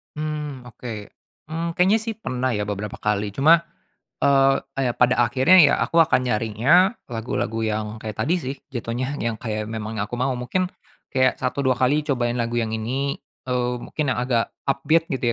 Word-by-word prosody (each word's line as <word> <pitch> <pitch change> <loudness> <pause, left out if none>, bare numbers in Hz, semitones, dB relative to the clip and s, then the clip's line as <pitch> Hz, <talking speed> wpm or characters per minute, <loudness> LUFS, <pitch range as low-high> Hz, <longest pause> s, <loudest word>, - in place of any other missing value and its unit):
Mmm, 150 -4 -4
oke. 125 0 -8 0.6
Mmm, 165 +2 -3
kayaknya 190 +5 +4
sih 225 0 -3
pernah 130 - -1
ya, 105 -3 -2
beberapa 105 0 -4
kali, 105 -1 -1
cuma, 160 +9 +5 0.6
eee, 135 -1 +4 0.3
ya - - 0
pada 125 +1 +3
akhirnya, 135 +9 +4
ya 145 -3 +6
aku 165 - -1
akan 130 -5 +2
nyarinya 120 - +3 0.2
lagu-lagu 115 -1 -2
yang 110 0 -1
kayak 110 -1 -7
tadi 155 +10 +1
sih, 140 -5 -4
jatohnya 125 +2 -3
yang 115 -4 -3
kayak 110 -2 -3
memang 110 0 -5
yang 100 - -1
aku 120 +3 -6
mau. 130 0 0
Mungkin 130 +10 -1 0.4
kayak 130 -1 +1
satu 135 +2 -1
dua 130 -1 +3
kali 145 +4 +2
cobain 120 -4 0
lagu 120 0 0
yang 110 -1 -2
ini, 130 +5 -2 0.3
eee, 125 -1 0
mungkin 145 +1 -2
yang - - -2
agak 120 -2 0 0.2
upbeat 155 +4 +2
gitu 125 -3 0
125 Hz, 175 wpm, -23 LUFS, 115-140 Hz, 0.6 s, ya